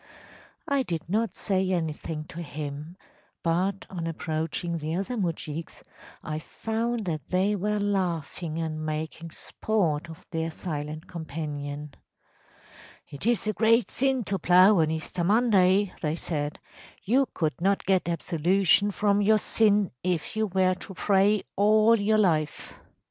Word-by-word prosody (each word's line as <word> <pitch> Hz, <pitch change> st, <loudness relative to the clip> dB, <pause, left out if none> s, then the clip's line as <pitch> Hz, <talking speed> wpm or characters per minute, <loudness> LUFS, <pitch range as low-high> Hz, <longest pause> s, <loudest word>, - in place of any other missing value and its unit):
I 280 Hz, -1 st, +2 dB
did 170 Hz, -11 st, -4 dB
not 210 Hz, +1 st, 0 dB
say 190 Hz, -2 st, 0 dB
anything 160 Hz, -2 st, -2 dB
to 170 Hz, -, -7 dB
him, 150 Hz, +2 st, -6 dB, 0.5 s
but, 185 Hz, +4 st, 0 dB
on 170 Hz, -3 st, -5 dB
approaching 165 Hz, +1 st, -3 dB
the 155 Hz, +2 st, -3 dB
other 200 Hz, +7 st, -2 dB
moujiks, 165 Hz, -5 st, -4 dB, 0.4 s
I 155 Hz, 0 st, -3 dB
found 225 Hz, +5 st, -3 dB
that 155 Hz, -4 st, -4 dB
they 190 Hz, +3 st, +2 dB
were 210 Hz, +2 st, -1 dB
laughing 175 Hz, -5 st, -2 dB
and 155 Hz, -1 st, -3 dB
making 155 Hz, +2 st, -4 dB
sport 170 Hz, -3 st, -1 dB
of 165 Hz, +2 st, -11 dB
their 165 Hz, -1 st, -1 dB
silent 155 Hz, -2 st, -5 dB
companion. 150 Hz, -3 st, -6 dB, 1.2 s
‚ÄėIt 145 Hz, +11 st, -1 dB
is 240 Hz, -, +1 dB
a 215 Hz, -, 0 dB
great 225 Hz, +4 st, +3 dB
sin 265 Hz, -2 st, +1 dB
to 195 Hz, -1 st, -2 dB
plough 185 Hz, +4 st, +6 dB
on 155 Hz, -1 st, +3 dB
Easter 160 Hz, +2 st, -2 dB
Monday,’ 200 Hz, -2 st, +3 dB
they 155 Hz, -1 st, 0 dB
said. 150 Hz, -3 st, -3 dB, 0.5 s
‚ÄėYou 260 Hz, +5 st, +3 dB
could 155 Hz, -1 st, -1 dB
not 195 Hz, +2 st, +1 dB
get 190 Hz, -3 st, +2 dB
absolution 180 Hz, +4 st, +2 dB
from 205 Hz, 0 st, +1 dB
your 215 Hz, +2 st, +5 dB
sin 210 Hz, -2 st, +3 dB
if 180 Hz, +5 st, -1 dB
you 220 Hz, 0 st, +1 dB
were 185 Hz, -1 st, +2 dB
to 185 Hz, +1 st, -9 dB
pray 200 Hz, +2 st, +3 dB
all 215 Hz, +2 st, +5 dB
your 215 Hz, +1 st, +3 dB
life. 160 Hz, -7 st, 0 dB
180 Hz, 140 wpm, -27 LUFS, 160-205 Hz, 1.2 s, plough